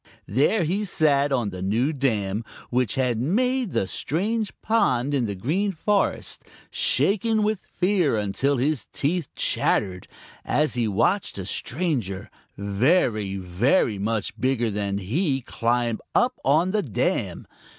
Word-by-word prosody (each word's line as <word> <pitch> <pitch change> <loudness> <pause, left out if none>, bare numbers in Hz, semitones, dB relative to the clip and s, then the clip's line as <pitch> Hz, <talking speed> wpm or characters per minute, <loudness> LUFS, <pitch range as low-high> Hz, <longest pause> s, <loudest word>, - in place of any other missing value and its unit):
There 145 - +2
he 185 +7 0
sat 145 -7 +2
on 120 -6 0
the 90 0 -7
new 115 +10 +1
dam, 110 -7 0 0.3
which 125 -3 +1
had 125 -4 +1
made 250 - +1
the - - +1
strange 205 - -1
pond 145 - +2
in 130 -5 +1
the 100 - -3
Green 170 - 0
Forest, 200 +3 0 0.3
shaking 215 +2 +2
with 215 -1 -1
fear 180 - +1
until 105 +7 0
his 140 -1 0
teeth 160 +1 -1
chattered, 90 -2 +1 0.4
as 150 +1 +1
he 120 -2 0
watched 115 - +1
a 95 - -4
stranger 115 - -2 0.3
very, 105 - +1
very 100 - +1
much 110 +1 -1
bigger 125 -4 +1
than 100 -1 -2
he 135 - 0
climb 120 -1 0 0.2
up 250 +1 +3
on 160 +7 +3
the 210 +1 +1
dam. 130 - -1
135 Hz, 135 wpm, -24 LUFS, -, 0.4 s, up